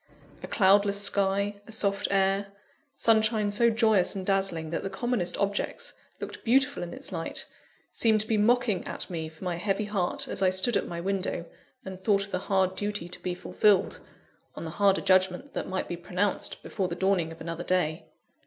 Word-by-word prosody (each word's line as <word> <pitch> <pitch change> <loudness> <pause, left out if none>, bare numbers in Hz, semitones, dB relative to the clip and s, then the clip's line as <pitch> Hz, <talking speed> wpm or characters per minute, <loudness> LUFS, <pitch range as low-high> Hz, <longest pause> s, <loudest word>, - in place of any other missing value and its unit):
A - - -7
cloudless 200 0 +4
sky, 200 0 0
a - - -10
soft 200 -2 +1
air, 195 0 +2 0.5
sunshine 220 -3 +3
so 235 +3 +4
joyous 220 -5 +3
and 190 -1 -4
dazzling 190 -5 0
that - - -2
the 195 - -4
commonest 240 -4 -1
objects 205 - -2 0.3
looked - - -7
beautiful 260 0 +2
in 175 - -5
its 265 +2 -5
light, - - -4 0.5
seemed 220 -2 +3
to 215 - -6
be 220 - +1
mocking 225 -1 +2
at - - -5
me 160 -2 -4
for 160 +3 -14
my 180 -2 -2
heavy 200 +3 -1
heart, 200 -4 -1
as - - -1
I 190 - +5
stood 190 +5 +3
at - - 0
my 170 -1 -5
window, 190 -2 -2 0.4
and 190 -1 -8
thought 200 0 +2
of 200 - -11
the 185 - -1
hard 190 -1 +2
duty 205 -2 -3
to 180 - -7
be 180 -1 -3
fulfilled, 200 +1 +2 0.6
on - - -6
the 160 - -5
harder 195 +2 +3
judgment 185 +7 +2
that - - -4
might 190 0 -2
be 175 - -4
pronounced, 185 +3 -1
before 190 -4 -2
the 170 - -4
dawning 185 -3 +1
of 165 - -11
another 165 0 -5
day. 175 -2 0
195 Hz, 190 wpm, -28 LUFS, 180-210 Hz, 0.6 s, I